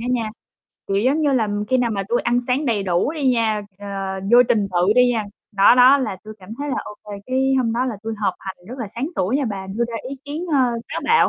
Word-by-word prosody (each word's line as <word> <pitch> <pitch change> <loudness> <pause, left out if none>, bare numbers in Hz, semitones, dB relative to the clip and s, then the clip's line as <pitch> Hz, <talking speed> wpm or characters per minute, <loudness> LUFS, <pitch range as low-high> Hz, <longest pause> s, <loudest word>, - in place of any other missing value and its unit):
á 235 - -5
nha, 230 -3 0 0.6
kiểu 195 - 0
giống 275 +6 +2
như 285 -2 +2
làm, 210 -4 0
khi 260 - +3
nào 240 -2 +1
mà 200 -2 -2
tui 240 - +1
ăn 240 +1 +1
sáng 270 +4 +1
đầy 220 -4 +1
đủ 185 - 0
đi 290 -5 0
nha, 225 -4 +1 0.2
ờ, 205 - -9 0.5
vô 245 +1 +9
trình 215 -5 +2
tự 180 +3 +3
đi 250 0 +5
nha, 220 -2 -1 0.3
đó, 200 +3 +6
đó, 255 +3 +7
là 255 -8 -2
tui 215 0 -9
cảm 185 - -15
thấy 290 +1 -4
là - - -1
ô 210 - -8
kê, 210 - -9
cái 265 +1 +1
hôm 230 -3 +1
đó 245 +2 0
là 250 -4 -2
tui 225 0 -4
họp 200 -3 0
hành 190 -1 -7
rất 255 +2 -8
là 225 - -4
sáng 240 +8 -4
tuổi 215 +9 +1
nha 285 - 0
bà, 195 -2 -5
đưa 210 +5 -1
ra 235 - -6
ý 275 - -6
kiến, 300 +5 -5
ơ, - - +4 0.3
táo - - -4
bạo 465 - +4
235 Hz, 270 wpm, -21 LUFS, 205-260 Hz, 0.6 s, vô